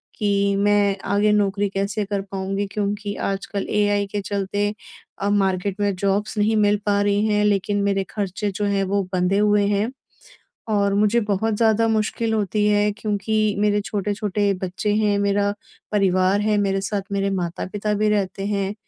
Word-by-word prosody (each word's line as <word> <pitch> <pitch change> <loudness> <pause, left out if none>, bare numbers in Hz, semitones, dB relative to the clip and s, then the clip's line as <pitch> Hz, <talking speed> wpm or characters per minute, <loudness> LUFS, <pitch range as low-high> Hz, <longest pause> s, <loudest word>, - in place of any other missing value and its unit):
कि 200 -1 +1
मैं 205 -1 +2
आगे 205 +1 +3
नौकरी 200 -1 +1
कैसे 200 +2 -2
कर 200 0 -2
पाऊँगी? 195 +1 -3
क्योंकि 205 0 -2
आजकल 195 +1 -3
एआई 205 -1 +2
के 205 +1 -3
चलते 205 +1 -2 0.5
अब 200 +1 +1
मार्केट 195 0 0
में 205 -1 +1
जॉब्स 200 +3 -1
नहीं 215 +1 +2
मिल 205 0 +3
पा 205 -1 +2
रही 205 +1 +2
हैं 210 -1 +2
लेकिन 205 0 +1
मेरे 195 -1 +1
खर्चे 205 0 -3
जो 205 +2 -2
हैं, 200 -1 +1
वो 200 +1 0
बंधे 180 +2 +1
हुए 210 -1 +3
हैं। 205 +3 0 0.8
और 200 -1 +2
मुझे 210 +3 +3
बहुत 210 +1 0
ज़्यादा 225 0 +3
मुश्किल 220 +1 0
होती 210 0 0
है 210 0 +3
क्योंकि 215 0 -1
मेरे 210 0 +2
छोटे-छोटे 205 0 -1
बच्चे 190 +3 -1
हैं, 210 -1 +2
मेरा 200 0 +1 0.4
परिवार 190 -1 +2
है 210 0 +1
मेरे 195 -1 0
साथ, 200 +1 -2
मेरे 200 0 0
माता-पिता 195 +3 -3
भी 210 +1 +1
रहते 195 -2 -1
हैं। 200 -1 -1
205 Hz, 165 wpm, -22 LUFS, 195-210 Hz, 0.8 s, आगे